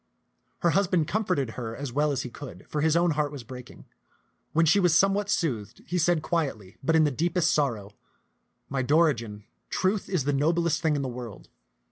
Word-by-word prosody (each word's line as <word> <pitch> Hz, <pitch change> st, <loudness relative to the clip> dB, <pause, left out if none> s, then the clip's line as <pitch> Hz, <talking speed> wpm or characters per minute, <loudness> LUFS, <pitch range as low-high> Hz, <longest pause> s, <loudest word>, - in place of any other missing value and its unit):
Her 170 Hz, -, +3 dB
husband 180 Hz, -5 st, +2 dB
comforted 180 Hz, -, 0 dB
her 115 Hz, -1 st, -5 dB
as 140 Hz, -2 st, -6 dB
well 150 Hz, +2 st, +2 dB
as 135 Hz, -2 st, -1 dB
he 125 Hz, -, -7 dB
could, 140 Hz, +1 st, -10 dB
for 150 Hz, -, -2 dB
his 160 Hz, +1 st, +3 dB
own 170 Hz, 0 st, +3 dB
heart 150 Hz, -1 st, 0 dB
was 140 Hz, -4 st, -8 dB
breaking. 125 Hz, +1 st, -11 dB, 0.7 s
When 165 Hz, +1 st, +3 dB
she 165 Hz, +6 st, +4 dB
was 175 Hz, -3 st, +4 dB
some 195 Hz, +2 st, +4 dB
what 205 Hz, 0 st, -2 dB
soothed, 130 Hz, -, -2 dB
he 180 Hz, +2 st, -1 dB
said 170 Hz, -1 st, +2 dB
quietly, 135 Hz, -, -2 dB
but 160 Hz, +4 st, +1 dB
in 160 Hz, -, +5 dB
the 150 Hz, -, +2 dB
deepest 170 Hz, +5 st, +1 dB
sor 140 Hz, -6 st, +2 dB
row, 100 Hz, 0 st, -11 dB, 0.4 s
" -, -, -48 dB, 0.3 s
My 135 Hz, -1 st, -2 dB
Dorigen, 125 Hz, -7 st, +1 dB, 0.3 s
truth 195 Hz, +2 st, 0 dB
is 180 Hz, -7 st, 0 dB
the 145 Hz, +2 st, 0 dB
noblest 165 Hz, +4 st, +1 dB
thing 160 Hz, -3 st, +2 dB
in 140 Hz, -, -1 dB
the -, -, -2 dB
world. 120 Hz, -4 st, -8 dB
150 Hz, 205 wpm, -27 LUFS, 130-170 Hz, 0.7 s, in